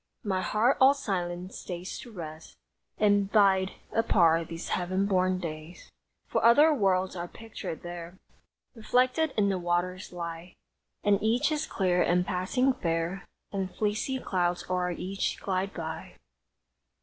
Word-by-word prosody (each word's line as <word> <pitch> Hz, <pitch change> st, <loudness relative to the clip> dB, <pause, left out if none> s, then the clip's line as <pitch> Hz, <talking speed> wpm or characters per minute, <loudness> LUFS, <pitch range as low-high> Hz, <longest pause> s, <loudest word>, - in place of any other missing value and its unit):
My 190 Hz, -4 st, 0 dB
heart 225 Hz, +7 st, +2 dB
all 270 Hz, +2 st, +7 dB
silent 180 Hz, -7 st, -3 dB
stays 180 Hz, 0 st, -6 dB
to 240 Hz, -, -10 dB
rest 160 Hz, -5 st, -9 dB, 0.4 s
And 205 Hz, -1 st, +3 dB
bide 195 Hz, -3 st, +4 dB, 0.2 s
apart 170 Hz, -7 st, +3 dB
these 165 Hz, +1 st, -6 dB
heaven 185 Hz, +2 st, 0 dB
born 185 Hz, -2 st, +2 dB
days! 160 Hz, -1 st, -8 dB, 0.3 s
For -, -, -1 dB
other 290 Hz, +7 st, +7 dB
worlds 190 Hz, -7 st, +1 dB
are 175 Hz, 0 st, -4 dB
pictured 220 Hz, -6 st, -8 dB
there; 175 Hz, +1 st, -7 dB, 0.6 s
Reflected 255 Hz, +6 st, +1 dB
in 200 Hz, -1 st, +3 dB
the 190 Hz, -2 st, 0 dB
waters 175 Hz, +1 st, -1 dB
lie; 170 Hz, 0 st, -7 dB, 0.5 s
And 205 Hz, -1 st, +3 dB
each 240 Hz, +8 st, +2 dB
is 305 Hz, 0 st, -1 dB
clear 180 Hz, -2 st, +1 dB
and 180 Hz, +1 st, +2 dB
passing 205 Hz, +9 st, +1 dB
fair, 170 Hz, -3 st, -2 dB, 0.2 s
And 190 Hz, -2 st, -3 dB
fleecy 215 Hz, +5 st, -1 dB
clouds 180 Hz, -7 st, -1 dB
o'er 180 Hz, -1 st, +1 dB
each 185 Hz, +3 st, -3 dB
glide 190 Hz, 0 st, -1 dB
by! 160 Hz, -3 st, -6 dB
185 Hz, 135 wpm, -28 LUFS, 175-215 Hz, 0.6 s, all